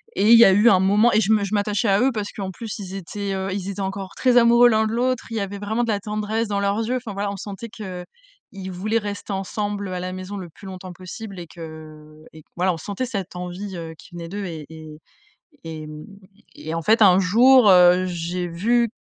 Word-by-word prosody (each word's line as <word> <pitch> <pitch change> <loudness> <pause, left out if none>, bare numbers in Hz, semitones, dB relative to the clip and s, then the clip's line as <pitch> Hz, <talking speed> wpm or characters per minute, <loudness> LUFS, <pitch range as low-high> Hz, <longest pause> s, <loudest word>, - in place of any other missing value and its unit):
et 210 - +2
il 235 - +10
y 230 - +9
a - - +6
eu 205 +5 +5
un 190 - +5
moment 205 +5 +4
et 215 - +4
je 210 0 +1
me 215 -2 +3
je 200 +1 -4
m'attachais 205 +1 0
à 195 +1 +3
eux. 265 +1 +3
Parce 210 -2 -4
qu'en 195 -2 -5
plus 215 +4 -7
ils 190 -1 -7
étaient, 195 +2 -5
heu, 190 0 -3
ils 195 -1 -4
étaient 200 0 -6
encore 195 0 -4
très 250 -1 +3
amoureux 235 +1 +6
l'un 220 -1 +2
de - - -3
l'autre. 250 +1 0
Il 225 - -3
y - - 0
avait 200 0 -4
vraiment 220 +4 -1
de 235 - -2
la 205 - 0
tendresse 215 +2 -2
dans 200 -1 -1
leurs 200 +1 0
yeux. 240 +3 -1
Enfin 235 -4 -7
voilà, 200 +1 -2
on 200 - -6
sentait 205 +3 -7
qu'ils 185 -5 -8 0.7
voulaient 215 +5 -1
rester 205 -1 -4
ensemble 200 +1 -3
à 180 -1 -4
la 185 0 -4
maison 185 +2 -6
le 180 -3 -7
plus 195 - -16
longtemps 185 -1 -8
possible 185 +2 -9
et 170 - -8
que 155 -2 -12
et 160 - -13
que - - -46
voilà. 180 +1 +1
On - - -6
sentait 200 +9 -4
cette 195 -7 -5
envie, 180 +2 -6
heu, 165 -1 -7
qui - - -16
venait 170 -1 -7
d'eux 200 +2 -5
et 160 -4 -7
et 155 -1 -11 0.6
et 155 -2 -7
mmh 150 0 -9 0.5
et 160 +1 -6
en 165 - -2
fait 220 +7 +3
un 190 -3 +7
jour, 235 +5 +6
heu, 180 0 +6
j'ai 175 0 -3
vu 230 +8 +1
195 Hz, 245 wpm, -22 LUFS, 180-215 Hz, 0.7 s, il